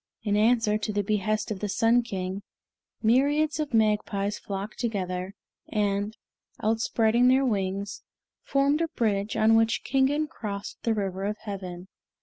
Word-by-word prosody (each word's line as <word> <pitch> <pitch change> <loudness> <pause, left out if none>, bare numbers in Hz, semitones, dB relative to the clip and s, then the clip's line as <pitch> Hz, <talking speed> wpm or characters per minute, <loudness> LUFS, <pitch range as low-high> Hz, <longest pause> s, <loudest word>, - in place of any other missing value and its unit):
In 205 -2 +1
answer 215 0 +3
to 215 - -2
the 205 0 0
behest 215 +1 -1
of 200 - -3
the 210 - -3
Sun 230 +3 +3
King, 190 -3 -4 0.6
myriads 290 +7 +3
of 300 -2 -2
magpies 210 -2 +1
flocked 200 +1 -6
together, 190 -4 -3 0.3
and, 205 0 -1 0.4
outspreading 225 +2 +2
their 265 +2 +4
wings, 200 -3 -2 0.4
formed 280 +3 +1
a 335 - +1
bridge 210 -7 -1
on 220 +1 +5
which 225 0 +2
Kingen 275 +3 +2
crossed 205 -6 -6
the 225 -1 +1
River 195 -2 -2
of 210 +1 -2
Heaven. 185 -3 -6
215 Hz, 140 wpm, -27 LUFS, 200-235 Hz, 0.6 s, on